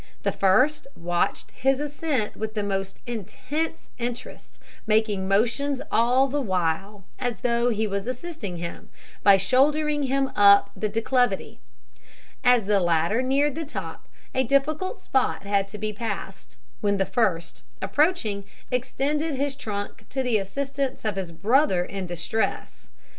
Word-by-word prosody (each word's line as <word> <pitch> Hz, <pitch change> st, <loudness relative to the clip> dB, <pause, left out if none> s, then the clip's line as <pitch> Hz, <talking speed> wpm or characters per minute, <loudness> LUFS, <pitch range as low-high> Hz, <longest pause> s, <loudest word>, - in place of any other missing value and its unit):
The -, -, +2 dB
first 255 Hz, +11 st, +3 dB
watched 175 Hz, 0 st, -1 dB
his 270 Hz, +1 st, +1 dB
ascent 290 Hz, -6 st, -2 dB
with 220 Hz, 0 st, -5 dB
the 210 Hz, -, 0 dB
most 195 Hz, -1 st, -3 dB
intense 285 Hz, -, -4 dB
interest, 240 Hz, 0 st, -6 dB, 0.3 s
making 215 Hz, -3 st, +2 dB
motions 245 Hz, +8 st, +1 dB
all 250 Hz, +4 st, +4 dB
the 285 Hz, +2 st, -1 dB
while 190 Hz, 0 st, -1 dB, 0.2 s
as 245 Hz, -2 st, -2 dB
though 240 Hz, -1 st, +2 dB
he 220 Hz, -1 st, 0 dB
was 200 Hz, +1 st, -3 dB
assisting 255 Hz, -, -5 dB
him, 170 Hz, 0 st, -7 dB, 0.3 s
by 200 Hz, -1 st, +7 dB
shouldering 295 Hz, +8 st, +2 dB
him 270 Hz, 0 st, 0 dB
up 200 Hz, 0 st, +6 dB
the 215 Hz, -, -1 dB
declivity. 225 Hz, -1 st, 0 dB, 0.8 s
As 245 Hz, -4 st, +5 dB
the 205 Hz, 0 st, +3 dB
latter 175 Hz, +5 st, +2 dB
neared 275 Hz, +3 st, +2 dB
the 325 Hz, +3 st, -4 dB
top, 195 Hz, -, -7 dB, 0.3 s
a 260 Hz, -, +2 dB
difficult 300 Hz, -, 0 dB
spot 260 Hz, -6 st, 0 dB
had 200 Hz, -1 st, +1 dB
to 205 Hz, +2 st, -9 dB
be 215 Hz, 0 st, -3 dB
passed, 200 Hz, -3 st, -6 dB, 0.2 s
when 200 Hz, -1 st, +1 dB
the 195 Hz, -, +1 dB
first, 170 Hz, -, 0 dB, 0.2 s
approaching, 275 Hz, -, +1 dB, 0.3 s
extended 285 Hz, +5 st, -1 dB
his 280 Hz, +1 st, -1 dB
trunk 205 Hz, -6 st, -5 dB
to 265 Hz, 0 st, -1 dB
the 240 Hz, -4 st, +2 dB
assistance 270 Hz, +6 st, -3 dB
of 215 Hz, -2 st, 0 dB
his 190 Hz, -3 st, -4 dB
brother 200 Hz, -, +2 dB
in 195 Hz, -1 st, -5 dB
distress. 175 Hz, +6 st, -3 dB
225 Hz, 140 wpm, -25 LUFS, 195-270 Hz, 0.8 s, by